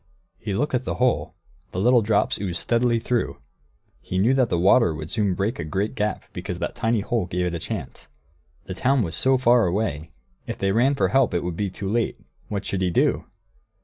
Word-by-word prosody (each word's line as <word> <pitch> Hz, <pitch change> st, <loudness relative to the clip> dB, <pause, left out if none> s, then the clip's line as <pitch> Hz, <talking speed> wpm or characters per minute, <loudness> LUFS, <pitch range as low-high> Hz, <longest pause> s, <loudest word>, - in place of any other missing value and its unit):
He 100 Hz, -3 st, -3 dB
looked 145 Hz, +6 st, -1 dB
at 125 Hz, 0 st, +1 dB
the -, -, -3 dB
hole; 125 Hz, 0 st, 0 dB, 0.4 s
the 90 Hz, -, -3 dB
little 120 Hz, +4 st, +5 dB
drops 105 Hz, -1 st, +1 dB
oozed 90 Hz, -4 st, -2 dB
steadily 120 Hz, 0 st, +1 dB
through; 120 Hz, +1 st, -1 dB, 0.6 s
he 90 Hz, -, -4 dB
knew 110 Hz, +8 st, +3 dB
that 130 Hz, -4 st, +2 dB
the 85 Hz, -, +1 dB
water 90 Hz, 0 st, +4 dB
would 80 Hz, 0 st, -7 dB
soon 105 Hz, -5 st, +1 dB
break 100 Hz, +3 st, -2 dB
a -, -, -2 dB
great 95 Hz, +8 st, -2 dB
gap, 105 Hz, 0 st, -2 dB
because -, -, -5 dB
that -, -, -3 dB
tiny 115 Hz, -1 st, 0 dB
hole 110 Hz, -3 st, -1 dB
gave 90 Hz, +1 st, -1 dB
it 90 Hz, -, -2 dB
a 85 Hz, -, -3 dB
chance. 85 Hz, -, -6 dB, 0.6 s
The 95 Hz, -, -5 dB
town 130 Hz, +6 st, +2 dB
was 85 Hz, -3 st, -4 dB
so 130 Hz, 0 st, +3 dB
far 120 Hz, -4 st, +4 dB
away 85 Hz, -5 st, -2 dB, 0.4 s
if -, -, -4 dB
they 95 Hz, 0 st, 0 dB
ran 125 Hz, +7 st, +3 dB
for -, -, +1 dB
help 135 Hz, -7 st, +2 dB
it 85 Hz, -, 0 dB
would 90 Hz, -1 st, -3 dB
be 100 Hz, +2 st, -1 dB
too 95 Hz, +2 st, -6 dB
late; 115 Hz, +3 st, -1 dB, 0.3 s
what 100 Hz, -2 st, -4 dB
should 95 Hz, -, -2 dB
he 90 Hz, -, +2 dB
do? 85 Hz, -, +1 dB
105 Hz, 215 wpm, -24 LUFS, 90-120 Hz, 0.6 s, little